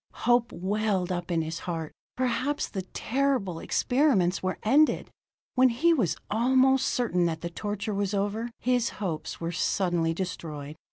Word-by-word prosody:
Hope 240 Hz, 0 st, +3 dB
welled 195 Hz, -1 st, -1 dB
up 175 Hz, -1 st, -3 dB
in 165 Hz, -2 st, +1 dB
his 160 Hz, +1 st, -4 dB
heart; 165 Hz, -3 st, -4 dB, 0.2 s
perhaps 255 Hz, +3 st, 0 dB
the 195 Hz, -, -4 dB
terrible 225 Hz, -2 st, -1 dB
experiments 245 Hz, -, +2 dB
were 185 Hz, 0 st, -2 dB
ended. 285 Hz, +8 st, +3 dB, 0.4 s
When 255 Hz, 0 st, +5 dB
he 320 Hz, +9 st, +3 dB
was 230 Hz, -, +1 dB
almost 260 Hz, +4 st, +3 dB
certain 180 Hz, -8 st, +1 dB
that 160 Hz, -1 st, -3 dB
the 170 Hz, -, -4 dB
torture 210 Hz, +3 st, -3 dB
was 200 Hz, 0 st, -1 dB
over, 205 Hz, +4 st, -1 dB
his 245 Hz, -1 st, +1 dB
hopes 175 Hz, -7 st, -4 dB
were 170 Hz, 0 st, -3 dB
suddenly 175 Hz, -2 st, 0 dB
destroyed. 155 Hz, -5 st, -5 dB
205 Hz, 150 wpm, -27 LUFS, 175-245 Hz, 0.4 s, When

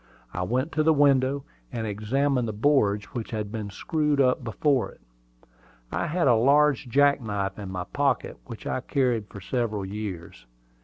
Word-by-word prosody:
I 90 Hz, -, -3 dB
went 130 Hz, -, -1 dB
to 155 Hz, -, +1 dB
the 160 Hz, 0 st, +4 dB
window, 140 Hz, -1 st, +3 dB, 0.3 s
and 115 Hz, -2 st, -3 dB
examined 120 Hz, +5 st, 0 dB
the 110 Hz, -, -3 dB
boards 105 Hz, -4 st, +2 dB
which 115 Hz, -2 st, -4 dB
had 105 Hz, -2 st, -4 dB
been 105 Hz, -2 st, -4 dB
screwed 150 Hz, -, 0 dB
up 130 Hz, -1 st, +3 dB
before 125 Hz, +4 st, +1 dB
it. -, -, -18 dB, 0.9 s
I -, -, -1 dB
had 170 Hz, -1 st, +1 dB
a 125 Hz, -, +6 dB
large 140 Hz, +3 st, +3 dB
jack 140 Hz, +2 st, +4 dB
knife 100 Hz, -3 st, -3 dB
in 100 Hz, -2 st, -6 dB
my 90 Hz, -1 st, -3 dB
pocket, -, -, -1 dB
which -, -, -9 dB
I -, -, -1 dB
had -, -, -4 dB
carried 120 Hz, -6 st, +1 dB
for 100 Hz, -, -10 dB
several 105 Hz, -1 st, -2 dB
years. 95 Hz, -, -7 dB
120 Hz, 175 wpm, -26 LUFS, 105-140 Hz, 0.9 s, a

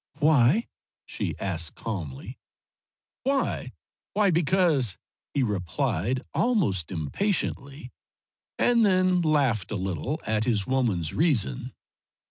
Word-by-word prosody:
"Why?" 150 Hz, -, +4 dB, 0.4 s
she -, -, -4 dB
asked 85 Hz, -5 st, -3 dB
calmly. 85 Hz, -, -6 dB, 0.8 s
"Why? 275 Hz, +1 st, -1 dB, 0.4 s
Why 205 Hz, -2 st, +4 dB
because," 165 Hz, -, +2 dB, 0.4 s
he 140 Hz, -, +2 dB
replied, 105 Hz, -, -1 dB
almost 150 Hz, -, +1 dB
impatiently, 135 Hz, -, -2 dB, 0.7 s
and 235 Hz, -1 st, +4 dB
then 185 Hz, -2 st, +3 dB
laughed 135 Hz, -, +1 dB
a 110 Hz, -, -3 dB
little 95 Hz, -, -2 dB
at 110 Hz, 0 st, 0 dB
his 105 Hz, -5 st, +1 dB
woman's 110 Hz, -12 st, 0 dB
reason. 120 Hz, -, 0 dB
130 Hz, 100 wpm, -26 LUFS, -, 0.8 s, Why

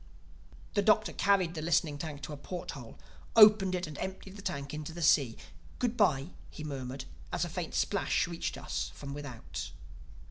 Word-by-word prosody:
The 205 Hz, -, +3 dB
Doctor 210 Hz, -3 st, +4 dB
carried 190 Hz, -4 st, +3 dB
the 160 Hz, -, -4 dB
listening 155 Hz, -2 st, +1 dB
tank 150 Hz, -2 st, -5 dB
to 150 Hz, -, -5 dB
a -, -, -4 dB
port 175 Hz, +5 st, -6 dB
hole, 120 Hz, -5 st, -10 dB, 0.4 s
opened 210 Hz, -4 st, +8 dB
it 180 Hz, 0 st, -1 dB
and 155 Hz, -2 st, -8 dB
emptied 190 Hz, +1 st, -5 dB
the 200 Hz, -, -9 dB
tank 140 Hz, -6 st, -4 dB
into 155 Hz, +1 st, -5 dB
the 170 Hz, 0 st, -4 dB
sea. 140 Hz, -6 st, +4 dB, 0.4 s
"Good 245 Hz, -1 st, 0 dB
bye!" 155 Hz, -, +3 dB, 0.2 s
he 155 Hz, -, -8 dB
murmured 135 Hz, -2 st, -5 dB, 0.3 s
as -, -, 0 dB
a -, -, -5 dB
faint -, -, -4 dB
splash -, -, +1 dB
reached -, -, -3 dB
us -, -, -3 dB
from 140 Hz, -1 st, -7 dB
without. 140 Hz, -5 st, -6 dB
155 Hz, 180 wpm, -31 LUFS, 140-190 Hz, 0.4 s, opened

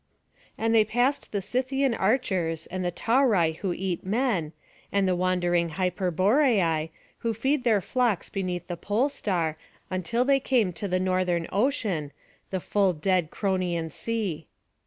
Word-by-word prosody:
And 225 Hz, 0 st, +1 dB
they 220 Hz, -1 st, +6 dB
passed 245 Hz, +6 st, 0 dB
the 200 Hz, -2 st, -2 dB
Scythian 260 Hz, +4 st, 0 dB
archers, 190 Hz, -8 st, 0 dB
and 185 Hz, +1 st, -4 dB
the 175 Hz, -, 0 dB
Tauri 205 Hz, -7 st, +2 dB
who 190 Hz, -, -2 dB
eat 180 Hz, 0 st, -3 dB
men, 200 Hz, -, 0 dB, 0.4 s
and 200 Hz, -1 st, +2 dB
the 185 Hz, -, +2 dB
wandering 175 Hz, -1 st, +1 dB
Hyperboreai, 185 Hz, -, +2 dB, 0.3 s
who 230 Hz, -2 st, -1 dB
feed 265 Hz, +4 st, 0 dB
their 220 Hz, -5 st, +3 dB
flocks 240 Hz, -2 st, 0 dB
beneath 180 Hz, -3 st, -3 dB
the 175 Hz, -, -4 dB
pole 215 Hz, -, 0 dB
star, 170 Hz, -, -1 dB, 0.3 s
until 230 Hz, +7 st, 0 dB
they 275 Hz, 0 st, +4 dB
came 250 Hz, -7 st, +2 dB
into 180 Hz, +4 st, -4 dB
the 185 Hz, -1 st, 0 dB
northern 185 Hz, -2 st, 0 dB
ocean, 200 Hz, -, 0 dB, 0.4 s
the 190 Hz, -2 st, -3 dB
dull 195 Hz, -3 st, +4 dB
dead 175 Hz, 0 st, +1 dB
Cronian 180 Hz, -5 st, -1 dB
Sea. 200 Hz, -7 st, -3 dB
190 Hz, 145 wpm, -26 LUFS, 175-230 Hz, 0.4 s, they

